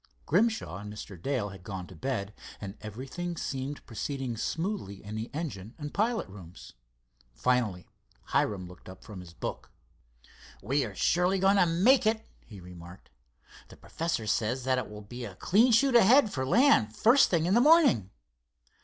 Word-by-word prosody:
Grimshaw 215 - +1
and 105 +1 -8
Mr. 105 -2 -9
Dale 125 -3 -1
had 95 -2 -12
gone 95 -2 -6
to 90 - -13
bed, 105 0 -3 0.3
and 100 -1 -7
everything 135 - -6
seemed 135 0 -5
proceeding 130 +1 -4
smoothly 165 - -4
in 105 +1 -7
engine 125 - -6
and 150 -2 -7
pilot 225 +3 0
rooms. 95 -3 -13 0.6
Finally 115 -8 0 0.4
Hiram 95 -4 0
looked 90 +1 -14
up 95 - -12
from 105 -4 -10
his 90 -2 -11
book. - - -6 0.9
"We 135 +7 +1
are 105 -4 -8
surely 180 - +2
going 195 +2 +3
to 180 - +4
make 215 +9 +4
it," 220 0 0 0.2
he 105 -4 -11
remarked. 90 +1 -13 0.6
"The - - -15
professor 165 -9 -3
says 115 +4 -1
that 130 0 +1
it 125 - -6
will 105 0 -10
be 120 +4 -8
a 100 -5 -7
clean 220 - +3
shoot 245 +3 +4
ahead 235 0 +6
for 130 -1 -2
land 135 - +4
first 250 +5 +5
thing 165 -3 +1
in 180 - +1
the 235 - +5
morning." 290 - +5
130 Hz, 165 wpm, -29 LUFS, -, 0.9 s, ahead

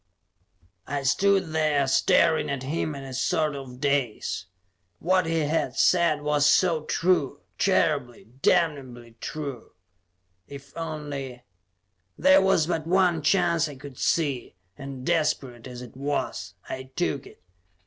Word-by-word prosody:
I 140 0 -3
stood 190 +5 +2
there, 155 -3 +1
staring 135 +4 +3
at 140 -2 -3
him 155 +2 -2
in 140 - -7
a 135 -1 -8
sort 155 +2 0
of 130 -2 -9
daze. 135 -9 -1 0.5
What 185 - +1
he 165 0 +1
had 155 +2 -1
said 170 -5 +3
was 145 -1 +2
so 160 -1 +3
true; 160 -6 +1 0.2
terribly, 145 - +1 0.2
damnably 130 -9 0
true. 140 -6 -6 0.7
If 140 -1 -12
only 145 -6 -6 0.7
There 190 +1 +6
was 190 -4 +3
but 165 -2 -2
one 180 -2 +3
chance 165 0 +2
I 145 - -9
could 135 -1 -11
see, 140 - 0 0.2
and 135 0 -8
desperate 145 -8 -1
as 125 -1 -8
it 125 - -12
was, 140 +2 -3
I 130 0 -6
took 145 -6 -1
it. - - -18
145 Hz, 130 wpm, -26 LUFS, 135-165 Hz, 0.7 s, There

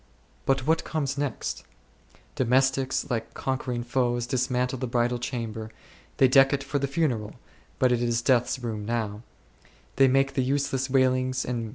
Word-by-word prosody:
But 135 -1 +2
what 160 +2 +2
comes 145 -4 -2
next? 145 -1 -3 0.7
Domes 130 +1 +3
tics, 135 0 -2
like 115 -2 -3
conquering 130 -2 -2
foes, 120 -1 0
dismantle 125 0 -1
the 130 - -2
bridal 120 0 0
chamber; 115 -3 -4 0.5
they 135 - +6
deck 135 +1 +6
it 135 -1 -1
for 140 +1 -2
the 140 - -1
funeral, 130 -8 -1 0.4
but 130 -1 +3
it 120 -1 +1
is 120 -1 0
death's 125 -2 +2
2 130 -2 -8
room 110 -3 -3
now; 110 -2 -2 0.8
they 135 0 +6
make 135 +1 +2
the 130 - +1
useless 135 0 0
wailings3 130 -1 +3
and 130 - 0
beatings 130 0 -2
of - - -5
the - - 0
hands. 115 -2 -3
130 Hz, 185 wpm, -26 LUFS, 120-135 Hz, 0.8 s, they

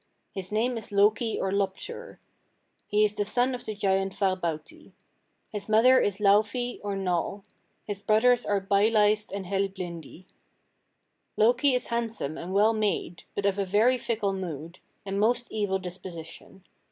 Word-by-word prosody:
His 190 -1 -6
name 230 +3 0
is 220 - -12
Loki 210 +3 +2
or 190 - -1
Loptur. 200 - -3 0.7
He 210 0 +3
is 210 - -1
the 205 - -1
son 245 +5 +1
of 245 - -6
the 215 - -4
giant 195 -1 0
Farbauti. 185 -6 -3 0.6
His 210 0 -6
mother 245 +4 +6
is 200 -1 0
Laufey 215 +4 +2
or 200 -1 -2
Nal; 195 +1 -2 0.4
his 205 -2 -6
brothers 235 +4 +3
are 205 -1 +1
Byleist 210 +2 +2
and 195 -1 -5
Helblindi. 185 -3 -4 1.1
Loki 250 +5 +4
is 250 - -1
handsome 225 -10 -2
and 175 +3 -7
well 210 +3 +4
made, 205 -5 -2
but 200 - -2
of 200 0 +1
a - - +2
very 220 +7 +3
fickle 215 -4 -1
mood, 170 -3 -6 0.3
and 195 0 -2
most 240 +3 +2
evil 205 -3 0
disposition. 180 0 -9
205 Hz, 150 wpm, -27 LUFS, 190-220 Hz, 1.1 s, mother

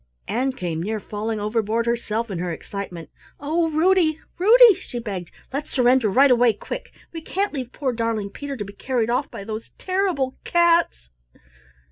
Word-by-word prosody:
Ann 255 +4 0
came 170 -8 -3
near 215 +4 -2
falling 215 +2 -4
overboard 220 +2 0
herself 235 -1 -2
in 180 - -3
her 175 0 -2
excitement. 175 -1 -7 0.3
"Oh, 325 +3 0
Ruddy, 320 0 +3 0.2
Ruddy!" 460 +4 +8
she 245 - -8
begged, 195 -7 -5 0.2
"let's 285 +2 -3
surrender 250 -3 +3
right 265 +6 +5
away 240 -2 +5
quick. - - -7 0.2
We 330 - -6
can't 390 +4 -2
leave 255 -4 -5
poor 265 -4 -2
darling 225 -3 -2
Peter 280 +2 -6
to 205 - -4
be 200 - -10
carried 235 +1 -1
off 265 +3 0
by 200 - -8
those 215 +2 -6
terrible 370 -9 -1
cats." 340 - +2
240 Hz, 165 wpm, -23 LUFS, 210-305 Hz, 0.3 s, Ruddy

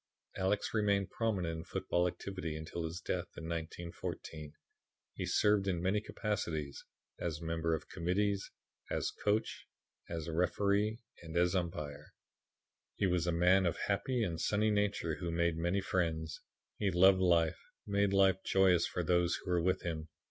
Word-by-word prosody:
Alex 95 +2 0
remained 100 -3 +1
prominent 95 -8 -1
in - - -6
football 90 0 0
activity 90 -3 -4
until 80 +2 -4
his 80 +2 -4
death - - -2
in - - -6
1914. 80 -2 -5 0.6
He - - -4
served 105 -1 +3
in 90 -3 +1
many 95 +4 +1
capacities, 80 -11 -3 0.4
as 80 -3 -2
member 80 0 0
of 80 - -7
committees, 100 +3 0 0.4
as - - -1
coach, 105 +1 -1 0.4
as 85 -2 -4
referee 100 +7 +1 0.2
and 85 0 -5
as 90 +1 +3
umpire. 80 -6 -3 0.8
He - - +1
was 90 -2 +1
a - - +3
man 90 +2 +4
of 85 - -1
happy 120 +4 0
and 85 -5 -2
sunny 105 +1 +2
nature 100 -6 0
who 90 -2 -3
made 85 0 +1
many 85 +4 0
friends. 80 -4 -1 0.4
He 100 - +2
loved 95 +1 +6
life 85 -3 +3 0.3
and 100 - -6
made 100 -1 +3
life 95 -1 +4
joyous 95 -3 +4
for 90 - -2
those 85 0 +2
who 90 - -5
were 90 -1 +3
with 90 +2 +1
him. 80 -2 -4
90 Hz, 155 wpm, -34 LUFS, 85-100 Hz, 0.8 s, loved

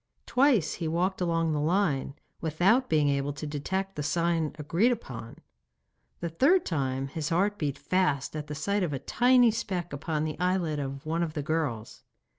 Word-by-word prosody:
Twice 250 - +3
he 165 - 0
walked 180 +4 0
along 165 -2 +1
the 150 - 0
line, 150 -4 0 0.2
without 180 - +2
being 150 -2 +3
able 140 0 0
to 150 - -6
detect 190 +7 -3
the 150 - -3
sign 165 +1 0
agreed 170 - +2
upon. 120 - -6 0.8
The 170 - -2
third 285 - +3
time 135 -4 -1
his 155 +2 -3
heart 200 +5 +1
beat 145 -3 -1
fast 155 -7 0
at 150 -1 -5
the 150 - -5
sight 200 +7 0
of 170 -5 -1
a - - -1
tiny 245 - +4
speck 185 -7 -3
upon 155 +1 -2
the 155 +1 -4
eyelid 180 -4 0
of 135 0 -5
one 165 +2 -1
of 160 -2 -2
the 150 - -2
girls. 145 -8 -2
160 Hz, 180 wpm, -28 LUFS, 145-190 Hz, 0.8 s, tiny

